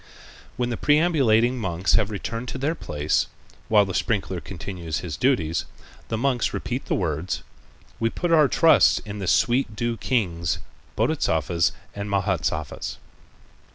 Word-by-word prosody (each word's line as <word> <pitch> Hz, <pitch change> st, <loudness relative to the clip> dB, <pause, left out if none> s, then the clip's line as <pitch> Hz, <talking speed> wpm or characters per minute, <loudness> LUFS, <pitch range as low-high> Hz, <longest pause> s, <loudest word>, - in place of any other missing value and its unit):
When 120 Hz, 0 st, -1 dB
the 115 Hz, -, -2 dB
perambulating 135 Hz, -6 st, +3 dB
monks 95 Hz, -3 st, 0 dB
have 110 Hz, -2 st, +3 dB
returned 115 Hz, +4 st, -4 dB
to 130 Hz, -, -4 dB
their 140 Hz, +5 st, 0 dB
place, 75 Hz, -, -1 dB, 0.4 s
while 105 Hz, -2 st, +5 dB
the 95 Hz, -, -5 dB
sprinkler 95 Hz, -5 st, -1 dB
continues 85 Hz, -4 st, -5 dB
his 85 Hz, -5 st, -5 dB
duties, 85 Hz, -, +1 dB, 0.4 s
the 115 Hz, -, -2 dB
monks 125 Hz, 0 st, 0 dB
repeat 125 Hz, +2 st, -3 dB
the -, -, +1 dB
words: 85 Hz, 0 st, -2 dB, 0.6 s
"We 115 Hz, -, +2 dB
put 175 Hz, +8 st, -2 dB
our 155 Hz, -3 st, +6 dB
trust 165 Hz, +4 st, +5 dB
in 105 Hz, 0 st, -6 dB
the 95 Hz, -, -4 dB
sweet 120 Hz, +1 st, +2 dB
dew 120 Hz, +1 st, -1 dB
kings, 85 Hz, -, 0 dB, 0.4 s
Bodhisattvas 85 Hz, -3 st, +1 dB, 0.2 s
and 100 Hz, 0 st, -5 dB
Mahâsattvas." 90 Hz, -7 st, -1 dB
105 Hz, 140 wpm, -24 LUFS, 90-125 Hz, 0.6 s, our